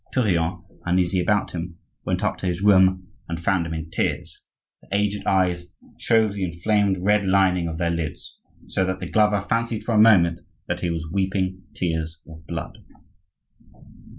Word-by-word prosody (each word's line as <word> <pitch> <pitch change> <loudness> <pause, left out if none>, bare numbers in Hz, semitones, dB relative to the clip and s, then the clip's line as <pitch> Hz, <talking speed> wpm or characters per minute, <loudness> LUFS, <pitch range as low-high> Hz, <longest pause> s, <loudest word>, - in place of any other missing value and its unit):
Tourillon, 90 -7 0 0.2
uneasy 90 +1 +1
about 100 +3 +1
him, 85 0 -6 0.3
went 90 +2 -1
up 105 - 0
to 95 - -3
his 90 +2 -2
room 95 -2 +4 0.2
and 85 0 -3
found 85 0 +1
him 80 - -4
in 80 0 -6
tears; - - -2 0.4
the - - -22
aged 100 0 -1
eyes 90 -2 +1 0.3
showed 110 -2 +3
the 100 -2 -3
inflamed 95 +3 +1
red 105 +2 +2
lining 95 -2 +3
of 80 -1 -4
their 85 0 0
lids, 80 -3 -5 0.3
so 95 - -1
that 95 0 -2
the 90 - -5
glover 105 +1 +2
fancied 115 +2 -1
for 115 - -2
a 105 - +4
moment 90 -7 +5 0.3
that - - -3
he 85 - -1
was 80 -1 -3
weeping 95 0 -1
tears 80 -3 -2
of 80 0 -13
blood. 85 -1 -6
95 Hz, 170 wpm, -23 LUFS, 85-100 Hz, 0.4 s, moment